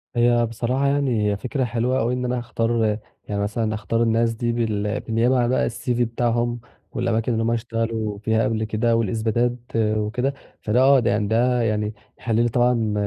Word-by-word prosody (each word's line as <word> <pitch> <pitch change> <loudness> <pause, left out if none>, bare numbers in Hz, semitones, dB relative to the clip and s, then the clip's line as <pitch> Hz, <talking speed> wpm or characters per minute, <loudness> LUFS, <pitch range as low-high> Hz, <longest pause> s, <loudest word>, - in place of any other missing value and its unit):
هي 120 0 +3
بصراحة 120 +4 -1
يعني 130 -7 +1
هي 100 - -1
فكرة 130 +4 -2
حلوة 120 +2 0
أوي 120 +2 0
إن 125 0 -2
أنا 125 0 -1
أختار 115 -2 0 0.3
يعني 100 -1 -2
مثلًا 110 +1 -1
أختار 110 +3 0
الناس 115 0 +2
دي 120 +1 -1
بال 105 -3 -1
بالنيابة 120 +3 +1
عن 120 -1 +2
بقى 130 - +1
الCV 120 +1 -7
بتاعهم 120 0 0 0.3
والأماكن 115 -1 0
اللي 115 0 0
هم 115 - +1
اشتغلوا 115 -2 -2
فيها 110 +2 +1
قبل 110 0 0
كده 110 +2 +1
والإثباتات 115 +2 +1 0.2
وكده، 110 +4 0 0.3
فده 110 +3 +1
آه، 135 +1 +6
ده 120 -1 +1
يعني 105 0 0
ده 120 +3 +2
يعني 105 -1 -1 0.3
يحِل 115 -2 -1
لي 120 - +1
طبعًا 120 -2 +1
115 Hz, 180 wpm, -22 LUFS, 110-120 Hz, 0.3 s, آه